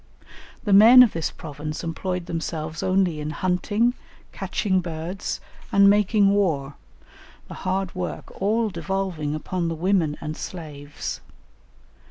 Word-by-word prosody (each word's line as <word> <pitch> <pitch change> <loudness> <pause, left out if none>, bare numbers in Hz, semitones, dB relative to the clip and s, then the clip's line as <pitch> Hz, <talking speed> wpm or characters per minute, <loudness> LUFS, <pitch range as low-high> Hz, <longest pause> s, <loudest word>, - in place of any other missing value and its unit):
The 205 - +1
men 230 +6 +10
of 235 - +1
this 165 -1 -1
province 150 +1 -7
employed 180 +2 -3
themselves 160 -1 -4
only 185 -4 +1
in 150 0 -4
hunting, 185 +8 +1 0.4
catching 190 0 -1
birds, 170 +2 -4 0.3
and 200 0 +6
making 205 0 +4
war, 160 -9 0 0.7
the - - -9
hard 190 0 -2
work 180 -1 -5
all 215 +2 +1
devolving 170 -3 -2
upon 170 +2 -3
the 165 - -2
women 170 -3 +1
and 155 +1 -5
slaves. 150 -5 -7
180 Hz, 125 wpm, -24 LUFS, 155-200 Hz, 0.7 s, men